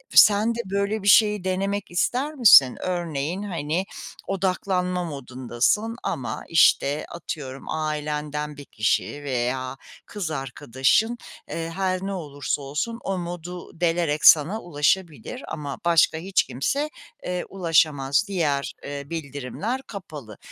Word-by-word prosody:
sen 215 +3 +6
de - - -5
böyle 200 +2 -1
bir - - -3
şeyi 210 -2 +5
denemek 195 +1 -2
ister 255 +11 0
misin? 195 - +8
Örneğin, 175 0 -2
hani, 170 -2 -2 0.4
odaklanma 185 -1 0
modundasın 135 - -1
ama, 120 -4 -3
işte, 150 -2 +4
atıyorum, 140 -6 -7
ailenden 150 -1 -3
1 145 - -9
kişi 120 +6 -1
veya 130 0 -2 0.3
kız 190 -6 -4
arkadaşın, 135 - 0 0.3
eee, 165 0 -4
her 185 -1 0
ne 195 +1 -3
olursa 145 -5 -3
olsun 150 +12 -3
o 195 -1 -2
modu 175 -1 -7
delerek 165 -3 +1
sana 165 +9 +6
ulaşabilir 175 - -1
ama 145 -3 -5
başka 165 -2 +4
hiç 185 +3 +1
kimse, 280 - -1 0.4
eee, 180 0 -2
ulaşamaz. 155 -6 +2
Diğer, 150 -8 -1
eee, 140 0 -5
bildirimler 160 - -4
kapalı. 150 - -9
165 Hz, 120 wpm, -24 LUFS, 145-195 Hz, 0.4 s, misin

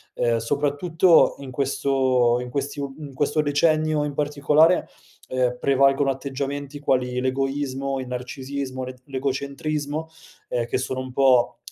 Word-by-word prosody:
Ehm, 120 -1 +1
soprattutto 145 +7 +3
in 135 -2 -8
questo 130 -2 +1
in 125 - -6
questi 140 +2 -3
u 140 -1 -5
in 145 -3 -8
questo 145 +3 +1
decennio 155 +1 +2
in 145 - -3
particolare, 150 +4 +3 0.4
ehm, 125 -1 0
prevalgono 135 0 +3
atteggiamenti 140 +1 -5
quali 125 -3 0
l'egoismo, 135 0 -1
il 130 - -7
narcisismo, 130 +1 -5
l'et 130 0 -8
l'egocentrismo, 140 +3 -3 0.4
ehm, 120 -1 -1
che 120 - -1
sono 130 0 -3
un 130 0 -6
po', 125 -3 +3
135 Hz, 135 wpm, -23 LUFS, 130-145 Hz, 0.4 s, soprattutto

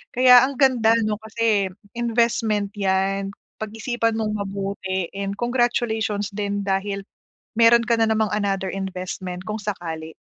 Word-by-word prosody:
Kaya 250 0 +8
ang 275 -1 -5
ganda 235 -4 +4
'no, 215 -1 -1
kasi 220 -3 0 0.3
investment 230 -3 +1
'yan. 195 0 0 0.3
Pag-isipan 225 +1 -2
mong 215 -1 -1
mabuti 195 -2 -3
and 200 0 -3
congratulations 235 -4 0
din 205 -1 -2
dahil 195 +1 -1 0.6
meron 235 0 +6
ka 235 - +3
na - - +4
namang 220 -1 +2
another 195 -2 -1
investment 185 -1 -5
kung 215 - -2
sakali. 165 -6 -5
210 Hz, 130 wpm, -23 LUFS, 195-230 Hz, 0.6 s, Kaya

